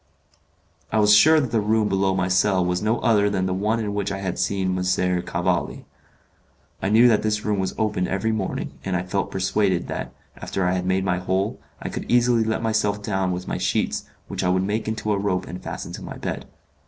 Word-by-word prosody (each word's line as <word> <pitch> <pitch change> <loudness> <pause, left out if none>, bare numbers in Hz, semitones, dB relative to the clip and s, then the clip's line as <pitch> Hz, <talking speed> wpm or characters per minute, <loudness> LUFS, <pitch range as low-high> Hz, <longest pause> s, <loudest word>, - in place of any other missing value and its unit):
I 110 - +1
was 105 -1 +5
sure 155 +10 +7
that 130 -6 -2
the 115 -2 +2
room 110 +1 +2
below 95 -1 +1
my 90 -1 0
cell 95 0 +2
was 90 0 0
no 110 +3 +1
other 105 -3 +3
than 95 -2 0
the 95 - -1
one 105 +4 0
in 105 -2 -2
which 100 -1 -2
I 95 - -2
had 95 -2 -3
seen 95 0 0
M. 90 - -1 0.4
Cavalli. - - -2 1.0
I 95 - 0
knew 115 +4 +6
that 115 -3 +4
this 105 -1 -1
room 105 -2 0
was 95 - -2
opened 105 -5 0
every 100 +4 0
morning, 105 -4 -3
and 95 -1 -2
I 90 - 0
felt 100 +2 -2
persuaded 95 -1 0
that, - - -4 0.2
after 95 - -3
I 90 - +2
had 90 0 -2
made 95 +1 +1
my 90 -2 +1
hole, 95 +3 -1 0.2
I - - -5
could - - -6
easily 120 -1 +4
let 110 +1 -1
myself 105 -2 0
down 95 -3 0
with 90 0 -4
my - - -2
sheets, - - 0 0.2
which - - -4
I 90 - +2
would 95 +1 +2
make 105 +3 -2
into 110 -1 -2
a 100 - 0
rope 95 -2 -1
and 90 +2 -7
fasten - - -6
to - - -7
my - - -7
bed. - - -5
100 Hz, 225 wpm, -23 LUFS, 95-110 Hz, 1.0 s, sure